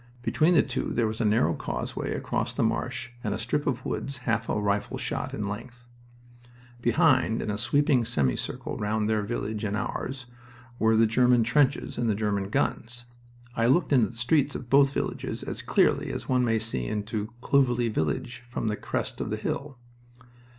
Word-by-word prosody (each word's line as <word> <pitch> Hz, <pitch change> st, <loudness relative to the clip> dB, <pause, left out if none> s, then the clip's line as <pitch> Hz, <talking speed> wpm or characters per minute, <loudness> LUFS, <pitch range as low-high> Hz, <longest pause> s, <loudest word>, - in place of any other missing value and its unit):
Between 160 Hz, +6 st, +3 dB
the 155 Hz, -, +6 dB
two 130 Hz, -1 st, -2 dB
there 120 Hz, -, +2 dB
was 110 Hz, +1 st, -2 dB
a -, -, +1 dB
narrow 105 Hz, -6 st, +3 dB
causeway -, -, -3 dB
across -, -, -2 dB
the -, -, 0 dB
marsh 125 Hz, +2 st, -1 dB
and 105 Hz, -3 st, -1 dB
a -, -, -3 dB
strip 125 Hz, +6 st, -1 dB
of 130 Hz, -4 st, -1 dB
woods 140 Hz, -1 st, -3 dB
half -, -, 0 dB
a -, -, +1 dB
rifle 100 Hz, 0 st, -1 dB
shot -, -, -3 dB
in 105 Hz, -, -3 dB
length. 120 Hz, +4 st, -7 dB, 1.0 s
Behind, 120 Hz, -2 st, +3 dB
in 105 Hz, -, -2 dB
a 105 Hz, -, -2 dB
sweeping 140 Hz, +1 st, +3 dB
semicircle 70 Hz, -, -1 dB
round 105 Hz, 0 st, 0 dB
their 110 Hz, -1 st, +1 dB
village 105 Hz, 0 st, -3 dB
and 105 Hz, 0 st, -1 dB
ours, 125 Hz, +4 st, -4 dB, 0.5 s
were 110 Hz, 0 st, +4 dB
the 115 Hz, -, +6 dB
German 120 Hz, +1 st, +4 dB
trenches 135 Hz, +2 st, +1 dB
and 120 Hz, -1 st, +1 dB
the 105 Hz, -, +2 dB
German 100 Hz, -2 st, -1 dB
guns. 120 Hz, +3 st, -1 dB, 0.5 s
I 115 Hz, 0 st, +2 dB
looked 145 Hz, +4 st, +3 dB
into 125 Hz, -5 st, +5 dB
the 120 Hz, -, -11 dB
streets 140 Hz, +4 st, +2 dB
of 120 Hz, -, -7 dB
both 140 Hz, 0 st, +6 dB
villages -, -, -3 dB
as -, -, -5 dB
clearly -, -, +2 dB
as -, -, -5 dB
one 130 Hz, -1 st, +2 dB
may 115 Hz, -2 st, +2 dB
see 110 Hz, -, -2 dB
into 105 Hz, -, -3 dB
Clovelly 125 Hz, -4 st, +2 dB
village 115 Hz, -, -2 dB
from 115 Hz, -2 st, -2 dB
the 105 Hz, -, 0 dB
crest -, -, -3 dB
of -, -, -3 dB
the -, -, -1 dB
hill. 140 Hz, -2 st, -4 dB
115 Hz, 185 wpm, -27 LUFS, 105-130 Hz, 1.0 s, the